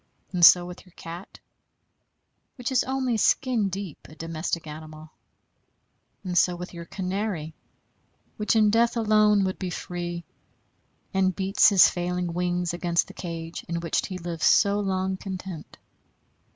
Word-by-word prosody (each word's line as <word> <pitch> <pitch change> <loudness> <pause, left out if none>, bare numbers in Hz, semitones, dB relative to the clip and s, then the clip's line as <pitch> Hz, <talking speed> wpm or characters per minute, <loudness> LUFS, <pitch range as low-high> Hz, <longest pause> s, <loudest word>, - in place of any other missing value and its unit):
And 175 -1 0
so 175 +1 +9
with 180 0 -9
your 180 - -22
cat, 170 +3 -10 1.2
which 250 -1 -4
is 255 - +3
only 260 -3 -1
skin 230 -2 +2
deep 190 -4 -7
a 155 - -13
domestic 165 +1 -4
animal; 155 0 -10 1.1
and 180 -2 -4
so 175 0 +3
with 180 +1 -8
your 170 -1 -8
canary, 185 -4 -3 0.8
which 210 +1 0
in 215 -1 +4
death 235 +2 +2
alone 215 -2 +4
would 185 0 -2
be 185 - -3
free, 175 0 -5 0.9
and 190 -1 +2
beats 195 +1 +4
his 195 -3 +7
failing 175 -1 -2
wings 175 0 -1
against 175 -1 +1
the - - -10
cage 165 -3 -6
in 170 0 -1
which 165 -2 -1
he 185 - -5
lived 170 -2 -6
so 200 0 +4
long 190 -1 -1
content. 185 -4 -7
180 Hz, 145 wpm, -26 LUFS, 170-200 Hz, 1.2 s, so